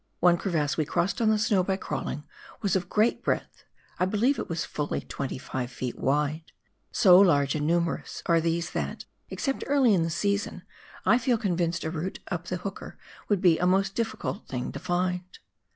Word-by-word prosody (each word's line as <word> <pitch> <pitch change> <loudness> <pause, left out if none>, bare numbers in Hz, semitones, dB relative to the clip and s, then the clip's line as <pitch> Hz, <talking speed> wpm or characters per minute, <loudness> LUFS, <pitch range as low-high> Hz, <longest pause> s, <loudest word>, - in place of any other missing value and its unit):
One 175 -1 +5
crevasse 165 -5 -1
we 155 - +1
crossed 190 - 0
on 220 - +4
the 215 - +4
snow 210 -3 +2
by 190 +1 0
crawling 150 - -4 0.4
was 200 -2 +2
of 180 -1 -1
great 220 +3 +2
breadth - - -2 0.2
— - - -30
I 180 - +3
believe 220 +9 +1
it - - -4
was 165 -1 -2
fully 150 -1 -3
25 130 -2 -4
ft. 125 0 -4
wide. 150 +3 0 0.5
So 180 -3 +7
large 145 -8 +4
and 150 -1 -1
numerous 170 0 -1
are 165 -2 +3
these 170 +1 -1
that, - - -4 0.2
except 270 -2 -2
early 275 -5 +4
in 180 - +3
the 165 - 0
season, 200 +1 -1 0.4
I 230 +6 +5
feel 250 -1 +2
convinced 175 -5 -1
a 160 - -2
route 175 +3 -4
up 175 0 -3
the 180 - -2
Hooker 195 +2 -7 0.3
would 205 -3 +2
be 175 -4 +5
a 180 - +2
most 195 +1 +2
difficult 225 -2 -3
thing 125 -2 -3
to - - -6
find. 180 0 0
180 Hz, 190 wpm, -27 LUFS, 160-200 Hz, 0.5 s, So